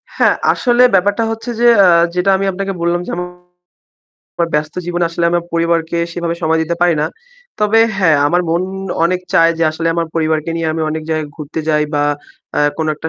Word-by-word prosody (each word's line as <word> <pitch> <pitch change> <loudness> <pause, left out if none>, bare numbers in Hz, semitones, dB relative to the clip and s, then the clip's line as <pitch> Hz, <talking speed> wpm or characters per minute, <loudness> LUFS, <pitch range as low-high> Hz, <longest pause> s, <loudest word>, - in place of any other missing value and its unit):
হ্যাঁ, - - +3 0.2
আসলে 245 -1 +2
ব্যাপারটা 205 +4 +2
হচ্ছে 225 +2 -6
যে, 240 - +2 0.2
আ - - +6 0.3
যেটা 180 +2 +1
আমি 195 - -2
আপনাকে 195 +1 -4
বললাম 170 +1 +1
যে - - -6
আমার 180 0 -10 0.8
ব্যস্ত 150 0 -1
জীবনে 175 0 -1
আসলে 170 0 -2
আমার 175 0 0
পরিবারকে 170 0 0
সেভাবে 170 -1 -3
সময় 160 0 +1
দিতে 170 +2 -2
পারি 175 -1 +4
না। 155 - +1 0.5
তবে 210 +2 +3 0.2
হ্যাঁ, 165 -6 +3
আমার 175 +4 +2
মন 170 +2 +1 0.4
অনেক 180 +2 0
চায় 165 0 +5
যে - - 0
আসলে 165 +1 -2
আমার 170 -1 -1
পরিবারকে 160 -1 0
নিয়ে 165 -1 -1
আমি 160 - -3
অনেক 160 0 -4
জায়গায় 155 -2 -2
ঘুরতে 155 +1 -5
যাই 150 -1 +2
বা 145 0 +1 0.5
অ্যা - - +1 0.2
কোন 160 - -2
একটা 160 +2 -5
170 Hz, 195 wpm, -16 LUFS, 160-180 Hz, 0.8 s, আ